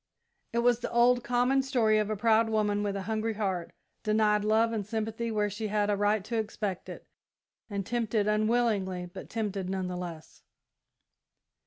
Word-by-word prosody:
It 235 0 0
was 240 -1 +4
the - - -4
old, 245 +1 +4
common 250 +2 +2
story 235 -5 +2
of 210 0 -1
a 215 - 0
proud 225 +1 +3
woman 210 -2 +1
with 205 -1 -1
a 195 - -3
hungry 220 +1 -2
heart, 190 -5 -2 0.3
denied 215 -1 +2
love 220 +2 +3
and 215 -2 -1
sympathy 220 +2 -3
where 210 -2 +1
she 205 +2 -4
had 210 0 +1
a - - +2
right 205 0 +1
to 230 +1 -2
expect 210 -3 -4
it, - - -9 0.6
and 200 -2 -3
tempted 225 -2 0
unwillingly, 210 -4 +1
but - - -9
tempted 205 -4 -3
none 190 -1 -2
the 180 - -4
less. 170 -3 -8
215 Hz, 175 wpm, -29 LUFS, 205-230 Hz, 0.6 s, was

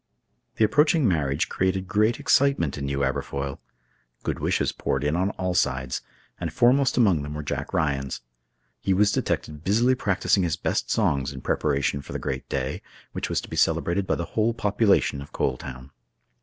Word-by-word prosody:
The 110 - +4
approaching 150 +4 +3
marriage 75 -5 +1
created 95 0 -1
great 110 +4 +2
excitement 135 - +2
in 70 - -4
New 70 0 -1
Aberfoyle. 70 +1 -2 0.6
Good - - -2
wishes - - +1
poured 65 0 -2
in 75 +2 +1
on 95 +3 +1
all 90 -1 -1
sides, 65 -5 0 0.4
and 85 -3 -3
foremost 125 - +3
among 100 - +4
them 75 +1 -6
were 75 - -4
Jack 70 - -4
Ryan's. 70 -3 -1 0.6
He 95 - +1
was 100 +1 +4
detected 75 -5 -2
busily 115 +7 +3
practicing 100 -4 +1
his 85 -2 0
best - - -1
songs 70 0 +1
in 65 -2 -8
preparation 70 +2 0
for - - -10
the - - -1
great 65 -1 -4
day, - - -2 0.3
which - - -4
was - - 0
to - - -10
be - - -6
celebrated 95 +3 +1
by - - +2
the 85 - -3
whole 115 +1 +1
population 100 -9 +2
of 70 - -11
Coal 65 - 0
Town. 65 +1 -9
85 Hz, 180 wpm, -25 LUFS, 70-105 Hz, 0.6 s, The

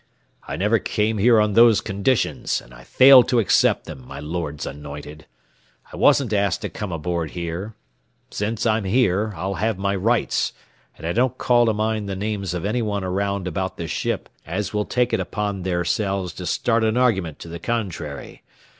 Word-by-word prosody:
"I - - -4
never 105 +7 +2
came 105 +2 -1
here 115 +2 +5
on 105 -1 +2
those 115 -1 +6
conditions, 100 +5 0
and - - -16
I - - -13
fail 130 - +8
to 125 - 0
accept 115 - +3
them, 65 - -9
my - - -8
Lord's 75 -1 -4
anointed. 75 +2 -9 0.7
I - - -6
wasn't 125 -6 +3
asked 100 -3 +1
to - - -2
come 105 -3 -6
aboard 85 0 -2
here. 90 +5 -4 0.6
Since 105 +3 -2
I'm 110 -2 +1
here, 105 -1 +2
I'll 95 +1 -3
have 110 -2 0
my 100 +1 -1
rights, 115 +5 0 0.4
and - - -9
I 85 - -1
don't 125 +1 +1
call 120 -2 +3
to 110 - +3
mind 110 -1 -1
the 95 - -3
names 100 -2 -3
of 90 - -4
any 115 +4 0
one 105 -3 -2
around 100 0 -2
about 95 +2 -3
this 85 - -5
ship - - -2 0.2
as 100 +2 -4
will 105 0 0
take 125 -1 0
it - - +2
upon 105 -2 -3
theirselves 95 +1 -1
to 90 - -7
start 115 -1 +1
an 110 +1 +1
argument 95 - +1
to - - -10
the 85 +1 -7
contrary. 85 -10 -4
100 Hz, 185 wpm, -22 LUFS, 85-110 Hz, 0.7 s, fail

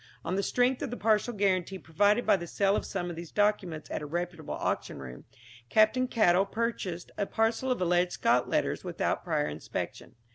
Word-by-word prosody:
On 170 - -1
the 195 - +1
strength 250 +5 +1
of 280 - -2
the 245 - -5
partial 220 +2 +2
guarantee 195 -3 0
provided 205 +7 +2
by - - +5
the 170 -2 -5
sale 195 +3 +2
of - - -2
some 175 -3 -3
of - - -7
these 170 0 -8
documents 200 -7 0
at - - -2
a 150 - -5
reputable 170 0 -4
auction - - -2
room, 65 -2 -9 0.4
Captain 220 +4 +4
Caddell 195 -5 +3
purchased 195 -6 -3
a 200 - 0
parcel 225 +3 0
of 250 - +1
alleged 180 0 +2
Scott - - +2
letters - - 0
without - - -1
prior 75 - 0
inspection. 75 +1 -6
195 Hz, 190 wpm, -29 LUFS, 175-220 Hz, 0.4 s, by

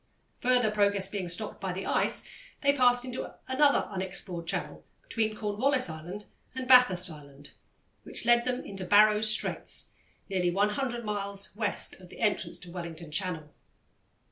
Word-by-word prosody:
Further 245 -3 +2
progress 200 -2 +2
being 195 -3 -4
stopped 205 +5 0
by 190 -2 -2
the 190 +2 -5
ice, - - 0 0.3
they 280 -1 +4
passed 245 -2 +3
into 255 0 -6
another 285 +2 +3
unexplored 185 -3 -4
channel - - -4 0.2
between 220 - -1
Cornwallis 220 - 0
Island 175 +6 -8 0.3
and 260 -1 -4
Bathurst 195 -9 +5
Island 145 -2 -13 0.5
which - - -2
led 240 0 +5
them 250 +1 -2
into 195 -2 -6
Barrow's 210 +3 +5
Straits, 215 - 0 0.3
nearly 185 -3 0
100 215 +6 0
miles 200 -1 -4
west 210 -3 -1
of 180 -1 -14
the - - -13
entrance 215 -3 0
to 175 - -10
Wellington 170 -2 -7
Channel. 160 -3 -3
205 Hz, 145 wpm, -29 LUFS, 180-240 Hz, 0.5 s, Bathurst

